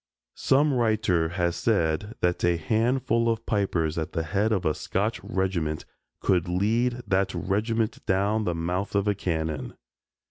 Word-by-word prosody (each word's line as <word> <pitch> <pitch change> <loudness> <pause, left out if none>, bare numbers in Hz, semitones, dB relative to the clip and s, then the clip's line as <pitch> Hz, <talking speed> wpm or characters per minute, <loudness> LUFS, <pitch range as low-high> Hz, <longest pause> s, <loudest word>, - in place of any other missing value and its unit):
Some 145 +2 +3
writer 110 -9 +2
has 85 -1 0
said 100 0 0
that 90 0 +1
a 85 -1 +3
handful 115 +5 +1
of 115 0 -1
pipers 85 -7 0
at 80 - -4
the 80 - -1
head 100 +7 0
of 100 -4 0
a 80 - +3
Scotch - - -2
regiment 85 -5 -1 0.4
could 90 -3 +2
lead 115 +7 +1
that 95 0 +1
regiment 110 +3 -1
down 100 +3 +1
the 90 - 0
mouth 90 +5 -2
of 100 0 +2
a 105 - +3
cannon. 80 -5 -3
95 Hz, 150 wpm, -26 LUFS, 85-110 Hz, 0.4 s, Some